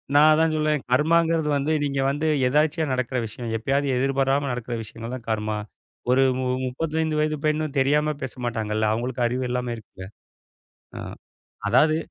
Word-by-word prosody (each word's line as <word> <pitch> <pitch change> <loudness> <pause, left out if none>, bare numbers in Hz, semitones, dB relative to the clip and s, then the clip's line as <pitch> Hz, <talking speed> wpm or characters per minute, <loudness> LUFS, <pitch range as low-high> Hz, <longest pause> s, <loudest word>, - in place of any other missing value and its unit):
நான் 150 +2 +7
அதான் 160 0 +2
சொல்வேன், 150 -2 +1
கர்மாங்கிறது 160 +2 +3
வந்து 150 +3 0
நீங்க 140 -1 -1
வந்து 145 +3 -1 0.2
எதர்ச்சியா 150 +1 +1
நடக்குற 130 0 -1
விஷயம், 115 +1 -6
எப்பயாவது 140 +5 0
எதிர்பாராமல் 135 +1 +1
நடக்குற 120 -1 -4
விஷயங்கள்தான் 115 +2 -7
கர்மா. 105 -1 -1 0.5
ஒரு 135 +1 +5 0.2
மு 130 - -1 0.2
முப்பத்தைந்து 155 +4 -1
வயது 155 0 +1
பெண் 155 0 +1 0.2
தெரியாம 150 +3 +2
பேச 130 - -4
மாட்டாங்கல்ல. 110 -2 0
அவங்களுக்கு 120 +1 -1
அறிவு 125 +2 -2
எல்லாம் 125 -1 -2
இருக்குல. 95 -4 -11 0.9
அ - - -5 0.7
அதாவது 155 0 +4
135 Hz, 145 wpm, -24 LUFS, 120-155 Hz, 0.9 s, நான்